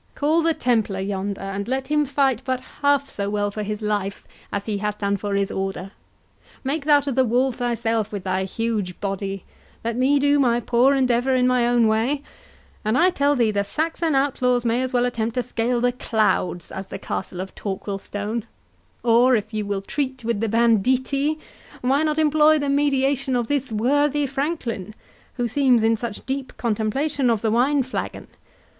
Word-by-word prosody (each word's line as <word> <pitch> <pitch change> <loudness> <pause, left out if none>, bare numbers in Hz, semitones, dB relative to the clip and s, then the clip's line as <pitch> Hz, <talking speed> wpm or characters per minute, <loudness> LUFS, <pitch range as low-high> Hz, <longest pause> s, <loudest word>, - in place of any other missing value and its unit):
Call 310 +3 +2
the 330 0 +1
Templar 220 -6 0
yonder, 195 0 -3
and 195 +1 -4
let 265 +1 -2
him 300 0 +2
fight 270 -3 +1
but 260 -1 -1 0.2
half 285 -1 +3
so 200 -4 -4
well 205 0 -1
for 215 - -5
his 210 +1 -4
life 205 -2 -2 0.3
as 200 0 -3
he 210 -2 -2
has 210 0 -2
done 200 -1 0
for 200 0 -3
his 200 0 0
Order—Make 195 - -6
thou 295 -1 +5
to 280 0 -3
the 260 +1 +3
walls 250 +1 +1
thyself 230 -3 -1
with 200 -3 -5
thy 185 0 -1
huge 210 -3 -3
body—Let 195 +3 -5
me 265 +4 +3
do 285 +1 +3
my 240 -3 +3
poor 245 +4 +3
endeavour 255 0 +2
in 250 -1 +3
my 250 -1 +3
own 240 -1 +3
way, 235 +7 +1 0.6
and 215 +3 +1
I 360 +2 +5
tell 285 -3 +2
thee 235 -4 +2
the 200 -1 0
Saxon 320 +6 -1
outlaws 250 -3 +1
may 235 +2 +1
as 260 -1 -2
well 245 -1 +2
attempt 230 -2 -2
to 250 - 0
scale 240 0 -1
the 245 +1 +2
clouds, 215 -7 0
as 190 0 -6
the - - -6
castle 185 -1 -5
of 190 +1 -5
Torquilstone; 205 +2 -4 0.6
or, 245 +2 +5
if 215 0 -3
you 210 -1 -2
will 200 -1 -2
treat 260 0 -3
with 230 -3 0
the 225 0 -1
banditti, 255 +6 +2 0.4
why 270 +4 +2
not 305 -1 0
employ 310 0 +4
the 285 -1 -1
mediation 275 -2 +1
of 240 -1 +1
this 275 -1 -1
worthy 290 +6 +2
franklin, 265 - -3 0.4
who 245 -1 -1
seems 250 -1 +3
in 225 0 +4
such 225 -1 -6
deep 265 0 -4
contemplation 245 +5 0
of 225 -3 +1
the 220 - +2
wine 265 +4 +3
flagon? 255 - -5
240 Hz, 180 wpm, -23 LUFS, 210-275 Hz, 0.6 s, thou